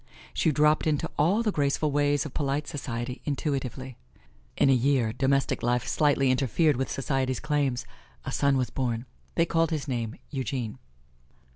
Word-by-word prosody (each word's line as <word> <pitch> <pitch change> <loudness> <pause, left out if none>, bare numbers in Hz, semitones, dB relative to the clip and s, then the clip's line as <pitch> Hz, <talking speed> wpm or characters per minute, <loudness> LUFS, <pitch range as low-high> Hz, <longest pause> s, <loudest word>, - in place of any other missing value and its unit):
She 160 - +2
dropped 150 +2 +3
into 150 -2 0
all 190 +10 +3
the 215 - +1
graceful 145 -1 +1
ways 145 0 +2
of 150 - -7
polite 145 +1 -1
society 125 -3 -5
intuitively. 135 -3 -3 0.6
In - - +4
a 135 - +6
year, 125 -3 +2
domestic 135 +1 +1
life 120 0 0
slightly 140 -3 +3
interfered 145 +4 +2
with 130 +2 -2
society's 135 -2 -1
claims 145 -5 0 0.4
a - - -3
son 140 -1 +2
was 130 -1 -1
born. 120 -2 -2 0.3
They 165 - +3
called 165 0 +1
his 155 -3 -3
name 115 -4 -2 0.2
Eugene. 130 -5 -3
135 Hz, 155 wpm, -27 LUFS, 130-150 Hz, 0.6 s, a